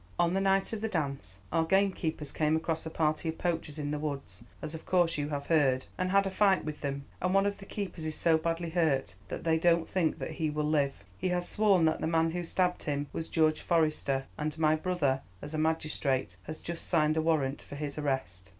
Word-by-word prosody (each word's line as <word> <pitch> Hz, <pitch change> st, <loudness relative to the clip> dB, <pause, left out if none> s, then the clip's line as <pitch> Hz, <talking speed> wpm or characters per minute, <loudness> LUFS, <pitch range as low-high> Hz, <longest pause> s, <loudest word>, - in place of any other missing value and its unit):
On 170 Hz, 0 st, +2 dB
the 195 Hz, -, +1 dB
night 195 Hz, +2 st, +2 dB
of 215 Hz, -, -3 dB
the 220 Hz, -, 0 dB
dance 140 Hz, -, -3 dB
our 165 Hz, -, +2 dB
gamekeepers 165 Hz, -4 st, 0 dB
came 155 Hz, 0 st, +1 dB
across 160 Hz, 0 st, -2 dB
a -, -, -3 dB
party 160 Hz, 0 st, 0 dB
of 160 Hz, -, -4 dB
poachers 165 Hz, -3 st, -2 dB
in 145 Hz, -1 st, -3 dB
the 150 Hz, -, -2 dB
woods, 145 Hz, -2 st, -5 dB, 0.2 s
as 155 Hz, +1 st, -4 dB
of 160 Hz, -, -7 dB
course 175 Hz, -2 st, +2 dB
you 145 Hz, 0 st, -2 dB
have 140 Hz, -1 st, -3 dB
heard, 135 Hz, -5 st, +3 dB
and 185 Hz, 0 st, -1 dB
had 195 Hz, +1 st, +4 dB
a 195 Hz, -, -1 dB
fight 195 Hz, -3 st, +3 dB
with 155 Hz, -1 st, -5 dB
them, 140 Hz, -1 st, -3 dB, 0.2 s
and 180 Hz, +2 st, +1 dB
one 195 Hz, 0 st, +4 dB
of 200 Hz, 0 st, -1 dB
the 195 Hz, -, -11 dB
keepers 195 Hz, -5 st, -5 dB
is 155 Hz, -1 st, -1 dB
so 165 Hz, -1 st, +4 dB
badly 165 Hz, +1 st, -1 dB
hurt 155 Hz, -, +1 dB
that -, -, -5 dB
they 160 Hz, -1 st, +2 dB
don't 170 Hz, 0 st, +3 dB
think 175 Hz, -5 st, 0 dB
he 160 Hz, -2 st, -2 dB
will 150 Hz, 0 st, -1 dB
live. 145 Hz, -3 st, 0 dB, 0.2 s
He -, -, 0 dB
has 180 Hz, 0 st, 0 dB
sworn 200 Hz, -6 st, +4 dB
that 160 Hz, -, +1 dB
the -, -, 0 dB
man 165 Hz, 0 st, +2 dB
who 175 Hz, +1 st, -3 dB
stabbed 180 Hz, +1 st, 0 dB
him 145 Hz, -2 st, -2 dB
was 160 Hz, -, -3 dB
George 155 Hz, -1 st, +2 dB
Forester, 155 Hz, -5 st, +1 dB
and 155 Hz, +1 st, -2 dB
my 155 Hz, -1 st, +4 dB
brother, 155 Hz, -6 st, 0 dB, 0.2 s
as 145 Hz, +8 st, -8 dB
a 155 Hz, -, -1 dB
magistrate, 155 Hz, -4 st, 0 dB
has 155 Hz, -, -6 dB
just 170 Hz, 0 st, -3 dB
signed 155 Hz, -3 st, +3 dB
a 160 Hz, -, +2 dB
warrant 150 Hz, -4 st, +1 dB
for -, -, -10 dB
his 145 Hz, 0 st, -4 dB
arrest. 95 Hz, -11 st, -2 dB
160 Hz, 230 wpm, -30 LUFS, 150-175 Hz, 0.2 s, had